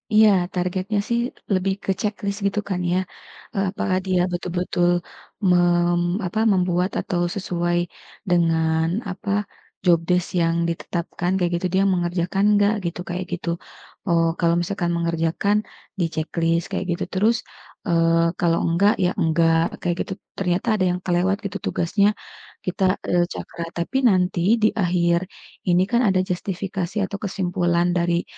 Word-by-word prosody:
Iya, 215 0 +7 0.2
targetnya 185 +3 -1
sih 235 0 +1 0.3
lebih 190 +1 +1
ke - - 0
checklist 205 -1 -2
gitu 200 +1 +1
kan 185 -2 -1
ya. 180 - +2 0.6
Eee, 195 - +1
apakah 185 -1 -1
dia 185 -1 +2
betul-betul, 175 0 -1 0.6
mem 175 0 +3 0.3
apa, 180 +5 -2
membuat 180 0 +1
atau 180 -3 -1
sesuai 175 -2 -1 0.5
dengan 160 -2 +2 0.2
apa, 195 +2 -5 0.5
job 170 -2 +5
desk 180 0 +2
yang 165 0 +2
ditetapkan, 170 +1 -3
kayak 175 -2 0
gitu. 185 - +1
Dia 190 - +4
mengerjakan 175 +2 0
nggak, 205 +1 +3 0.2
gitu, 175 - -11
kayak 180 +1 -3
gitu. 170 - -5 0.6
Oh, 165 -1 +3
kalau 170 -1 +3
misalkan 175 -1 -2
mengerjakan, 170 +4 +1 0.4
di-checklist, 165 0 0
kayak 190 - -1
gitu. 175 +2 -1
Terus, 220 +5 +3 0.5
eee, 165 0 +3
kalau 170 -1 +2
enggak 195 +6 +3
ya 180 - +3
enggak, 165 0 +2
kayak 175 -1 0
gitu. 190 - -7 0.2
Ternyata 180 +3 -1
ada 185 -3 +1
yang 180 - -2
kelewat 185 +2 +2
gitu 200 0 -3
tugasnya, 200 +4 +2 0.6
kita, 185 +1 0 0.2
eee, 175 0 +3
cakra, 170 - -6
tapi 170 +10 -1
nanti 180 -2 +1 0.2
di 215 - +7 0.2
akhir 170 -1 +2 0.5
ini 175 +1 +4
kan 240 0 +3
ada 190 -1 +3
justifikasi 185 0 -3
atau 200 - -6
kesimpulan 175 -3 0
dari, 170 0 +1
180 Hz, 140 wpm, -22 LUFS, 170-190 Hz, 0.6 s, Iya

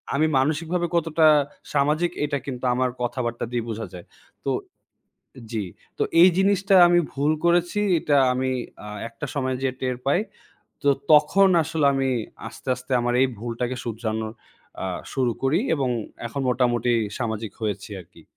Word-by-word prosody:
আমি 155 +3 +3
মানসিকভাবে 165 +5 0
কতটা 165 -1 +3 0.5
সামাজিক 150 +4 +2
এটা 145 -1 -1
কিন্তু 130 -2 -5
আমার 130 0 +1
কথাবার্তা 120 -1 -2
দিয়ে 120 -1 -1
বোঝা 110 0 -4
যায়। 90 -1 -9 0.4
তো - - +1 1.0
জি, 110 -3 -2 0.3
তো - - +1 0.2
এই 185 - +9
জিনিসটা 195 0 +3
আমি 175 0 +4
ভুল 145 +2 +1
করেছি 175 +3 +2 0.2
এটা 145 -2 +2 0.2
আমি 130 +1 -1 0.3
আ - - -7 0.2
একটা 115 - -7
সময় 130 -2 -1
যেয়ে 130 -1 -1
টের 130 -1 -1
পাই। 140 +6 +3 0.6
তো 145 - +2 0.2
তখন 190 +6 +6
আসলে 155 -2 0
আমি 135 -1 +1 0.4
আস্তে, - - -12
আস্তে 125 +1 -8
আমার 120 0 0
এই 135 - +5
ভুলটাকে 120 +2 -3
শুধরানো 110 -1 -3 0.5
আ 95 - -2 0.3
শুরু 130 -3 +1
করি 145 +8 +2
এবং 135 -3 -1 0.4
এখন 130 +5 -4
মোটামুটি 120 -1 +1 0.3
সামাজিক 110 -4 -3
হয়েছি 105 -1 -3
আরকি। 85 - -17
130 Hz, 150 wpm, -24 LUFS, 120-155 Hz, 1.0 s, এই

